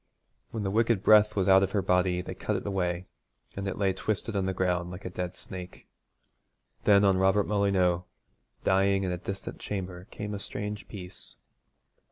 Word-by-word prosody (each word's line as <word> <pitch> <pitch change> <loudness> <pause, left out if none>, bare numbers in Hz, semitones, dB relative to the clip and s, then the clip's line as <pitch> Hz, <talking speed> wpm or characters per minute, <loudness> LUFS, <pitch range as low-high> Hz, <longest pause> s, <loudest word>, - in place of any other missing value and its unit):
When 110 -2 -4
the 95 - -1
wicked 115 -1 +2
breath 105 0 +6
was 95 -3 +1
out 95 0 +7
of 95 0 0
her 100 - +2
body 90 0 +2
they - - -6
cut - - -2
it - - -3
away, 90 -3 -1 0.5
and 100 0 -4
it 95 - -3
lay 95 -2 +2
twisted 105 +3 -2
on 95 -1 0
the - - +1
ground 90 -1 0
like 90 +2 -9
a 90 - -4
dead 90 0 -4
snake. 90 -1 -9 1.0
Then 100 -1 +6
on 95 -1 +4
Robert 95 +2 +4
Molyneux, 95 -4 +2 0.6
dying 95 +1 +3
in 90 - -1
a 90 - -2
distant 100 +2 -6
chamber, 95 -3 -5
came 105 0 -5
a 100 - -4
strange 105 +1 -5
peace. 90 -3 -10
95 Hz, 185 wpm, -28 LUFS, 90-100 Hz, 1.0 s, out